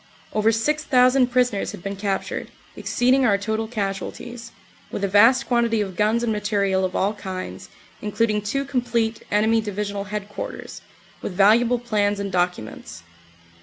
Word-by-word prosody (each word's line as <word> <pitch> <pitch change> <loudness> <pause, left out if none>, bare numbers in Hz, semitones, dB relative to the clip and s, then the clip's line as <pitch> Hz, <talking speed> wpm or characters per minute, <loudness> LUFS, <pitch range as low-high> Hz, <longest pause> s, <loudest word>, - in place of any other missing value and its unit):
Over 215 +1 +3
six 300 +8 0
thousand 255 -2 +4
prisoners 245 -4 0
had - - -10
been 195 0 -4
captured, 195 0 -3 0.3
exceeding 255 +2 +2
our 210 -5 +4
total 220 +2 -2
casualties, 230 +2 -5 0.4
with 200 - -5
a - - +2
vast 225 +7 +5
quan 235 -1 +2
tity 220 -2 +1
of 190 -2 -9
guns 215 +5 +2
and 225 -2 +1
material 200 -2 0
of 185 -1 -2
all 200 +3 +1
kinds, 190 -2 -7 0.3
including 210 0 0
two 275 +7 -2
complete 235 -4 -1
enemy 220 +2 +3
Divisional 205 -1 -4
Headquarters, 205 0 -6 0.4
with - - -4
valuable 225 +6 +4
plans 210 -4 0
and 200 -1 -3
documents. 175 -11 -3
210 Hz, 150 wpm, -23 LUFS, 200-235 Hz, 0.4 s, vast